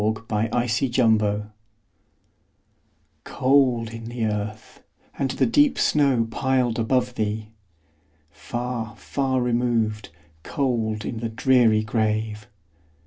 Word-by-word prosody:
Emily 110 Hz, +1 st, +1 dB
Brontë 110 Hz, +1 st, -1 dB, 0.2 s
Remembrance 105 Hz, -3 st, +2 dB, 1.8 s
COLD 125 Hz, -4 st, +2 dB
in 115 Hz, 0 st, -8 dB
the 120 Hz, -2 st, -2 dB
earth, 105 Hz, 0 st, -5 dB, 0.3 s
and 135 Hz, -, -1 dB
the 130 Hz, -, +1 dB
deep 290 Hz, +3 st, +3 dB
snow 135 Hz, -6 st, +2 dB
piled 130 Hz, -2 st, 0 dB
above 125 Hz, +2 st, +1 dB
thee! 110 Hz, -1 st, -3 dB, 0.8 s
Far, 120 Hz, -2 st, -5 dB
far 130 Hz, -2 st, -1 dB
removed, 115 Hz, -3 st, 0 dB, 0.3 s
cold 110 Hz, -, -2 dB
in 115 Hz, -, -4 dB
the 115 Hz, 0 st, -3 dB
dreary 115 Hz, -2 st, +3 dB
grave! 110 Hz, -1 st, -1 dB
115 Hz, 100 wpm, -23 LUFS, 110-125 Hz, 1.8 s, deep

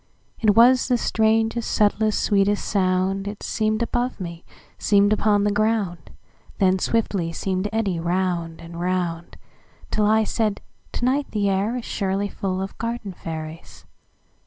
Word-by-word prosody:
It 210 Hz, -3 st, +3 dB
was 245 Hz, +2 st, +6 dB
the 250 Hz, -1 st, +2 dB
strangest, 225 Hz, +1 st, +1 dB
subtlest, 215 Hz, 0 st, +2 dB
sweetest 205 Hz, 0 st, +2 dB
sound:It 195 Hz, +1 st, 0 dB
seem'd 215 Hz, +1 st, 0 dB
above 245 Hz, +1 st, -2 dB
me, 170 Hz, -2 st, -7 dB, 0.4 s
seem'd 205 Hz, 0 st, +4 dB
upon 205 Hz, -1 st, +2 dB
the 205 Hz, -, +2 dB
ground, 205 Hz, -6 st, -1 dB, 0.5 s
Then 190 Hz, -1 st, +3 dB
swiftly 195 Hz, -6 st, 0 dB
seem'd 185 Hz, +2 st, -2 dB
to 210 Hz, -, -3 dB
eddy 195 Hz, -6 st, 0 dB
round 170 Hz, -1 st, -1 dB
and 170 Hz, 0 st, -9 dB
round, 175 Hz, -2 st, -2 dB, 0.5 s
Till 210 Hz, -1 st, +2 dB
I 220 Hz, +1 st, +4 dB
said: 215 Hz, -1 st, -1 dB, 0.3 s
"To 245 Hz, -, -2 dB
night 275 Hz, +3 st, +1 dB
the 205 Hz, -2 st, 0 dB
air 195 Hz, +4 st, 0 dB
isSurely 200 Hz, -4 st, -2 dB
full 190 Hz, -1 st, -2 dB
of 195 Hz, -, -7 dB
garden 230 Hz, -4 st, -4 dB
fairies." 160 Hz, -1 st, -8 dB
200 Hz, 140 wpm, -23 LUFS, 185-220 Hz, 0.5 s, was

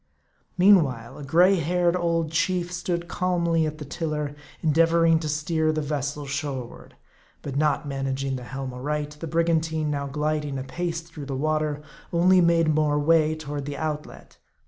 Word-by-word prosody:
Meanwhile, 145 Hz, -, +3 dB
a -, -, -7 dB
gray 180 Hz, +7 st, +4 dB
headed 175 Hz, +2 st, +1 dB
old 165 Hz, -3 st, 0 dB
chief 175 Hz, +1 st, 0 dB
stood 175 Hz, -1 st, -3 dB
calmly 170 Hz, -3 st, +1 dB
at 155 Hz, 0 st, -5 dB
the 150 Hz, -, -7 dB
tiller, 150 Hz, -1 st, -3 dB, 0.3 s
endeavoring 165 Hz, +1 st, +4 dB
to 155 Hz, -1 st, -4 dB
steer 155 Hz, +1 st, 0 dB
the 155 Hz, -1 st, -2 dB
vessel 145 Hz, 0 st, -3 dB
shoreward. 135 Hz, -3 st, -5 dB, 0.5 s
But 140 Hz, -2 st, -5 dB
not 150 Hz, 0 st, +1 dB
managing 135 Hz, -1 st, -2 dB
the 125 Hz, -1 st, -7 dB
helm 135 Hz, 0 st, -5 dB
aright, 145 Hz, +3 st, -3 dB
the 165 Hz, -, -5 dB
brigantine, 160 Hz, -1 st, +1 dB
now 140 Hz, -1 st, -2 dB
gliding 150 Hz, 0 st, -2 dB
apace 165 Hz, +6 st, -3 dB
through 160 Hz, -4 st, -10 dB
the 135 Hz, -, -3 dB
water, 155 Hz, 0 st, -1 dB, 0.3 s
only 180 Hz, +2 st, +5 dB
made 165 Hz, -2 st, +3 dB
more 150 Hz, -1 st, +2 dB
way 155 Hz, +1 st, +3 dB
toward 145 Hz, -2 st, -5 dB
the 145 Hz, -1 st, -5 dB
outlet. 150 Hz, -1 st, -6 dB
155 Hz, 155 wpm, -25 LUFS, 145-165 Hz, 0.5 s, only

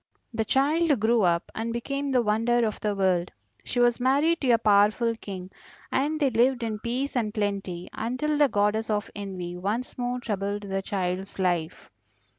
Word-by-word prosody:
"The 225 Hz, 0 st, -1 dB
child 290 Hz, +3 st, +2 dB
grew 225 Hz, +2 st, +3 dB
up 170 Hz, -2 st, +1 dB
and 225 Hz, +1 st, -3 dB
became 275 Hz, +4 st, -3 dB
the 255 Hz, -3 st, +2 dB
wonder 230 Hz, +2 st, +2 dB
of 215 Hz, -, -3 dB
the 210 Hz, -1 st, -1 dB
world. 185 Hz, -2 st, +1 dB, 0.3 s
She 245 Hz, -, -3 dB
was 240 Hz, 0 st, +3 dB
married 285 Hz, +7 st, +2 dB
to 265 Hz, -, 0 dB
a 235 Hz, -, +6 dB
powerful 215 Hz, +2 st, +3 dB
King, 190 Hz, -4 st, -8 dB, 0.4 s
and 300 Hz, +4 st, 0 dB
they 280 Hz, -4 st, +2 dB
lived 245 Hz, +2 st, +2 dB
in 220 Hz, -2 st, -3 dB
peace 250 Hz, +5 st, -2 dB
and 225 Hz, -4 st, 0 dB
plenty 200 Hz, -5 st, -3 dB
until 255 Hz, +7 st, -1 dB
the 290 Hz, -1 st, +4 dB
Goddess 210 Hz, +1 st, +1 dB
of 210 Hz, 0 st, -1 dB
Envy 185 Hz, -3 st, -5 dB
once 215 Hz, +8 st, -3 dB
more 245 Hz, 0 st, -1 dB
troubled 205 Hz, -3 st, -3 dB
the 195 Hz, -1 st, -2 dB
child's 190 Hz, 0 st, -3 dB
life. 175 Hz, -3 st, -1 dB
220 Hz, 175 wpm, -26 LUFS, 200-250 Hz, 0.4 s, a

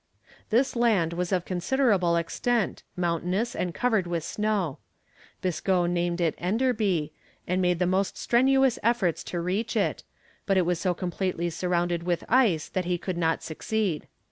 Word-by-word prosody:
This 250 Hz, +5 st, +2 dB
land 210 Hz, -9 st, +2 dB
was 180 Hz, +1 st, -2 dB
of 180 Hz, -2 st, +1 dB
considerable 190 Hz, -2 st, +2 dB
extent, 215 Hz, +7 st, 0 dB
mountainous 180 Hz, +6 st, -1 dB
and 180 Hz, -, -1 dB
covered 220 Hz, -2 st, +1 dB
with 170 Hz, -2 st, -2 dB
snow. 210 Hz, -8 st, -1 dB, 0.6 s
Biscoe 185 Hz, 0 st, +1 dB
named 175 Hz, 0 st, 0 dB
it 165 Hz, -3 st, +2 dB
Enderby, 200 Hz, -, 0 dB, 0.3 s
and 185 Hz, +1 st, +1 dB
made 180 Hz, -1 st, +2 dB
the 180 Hz, -, +1 dB
most 190 Hz, +2 st, 0 dB
strenuous 265 Hz, +1 st, +3 dB
efforts 220 Hz, -7 st, +1 dB
to 175 Hz, -, -3 dB
reach 195 Hz, +7 st, -2 dB
it, 205 Hz, -, 0 dB, 0.5 s
but 195 Hz, -2 st, +3 dB
it 185 Hz, -, +3 dB
was 175 Hz, -1 st, 0 dB
so 180 Hz, 0 st, 0 dB
completely 175 Hz, -1 st, -2 dB
surrounded 175 Hz, 0 st, 0 dB
with 175 Hz, 0 st, -1 dB
ice 225 Hz, -, +3 dB
that 185 Hz, -1 st, -2 dB
he 175 Hz, 0 st, 0 dB
could 185 Hz, +1 st, -4 dB
not 165 Hz, -1 st, 0 dB
succeed. 185 Hz, +1 st, -2 dB
180 Hz, 155 wpm, -27 LUFS, 175-215 Hz, 0.6 s, strenuous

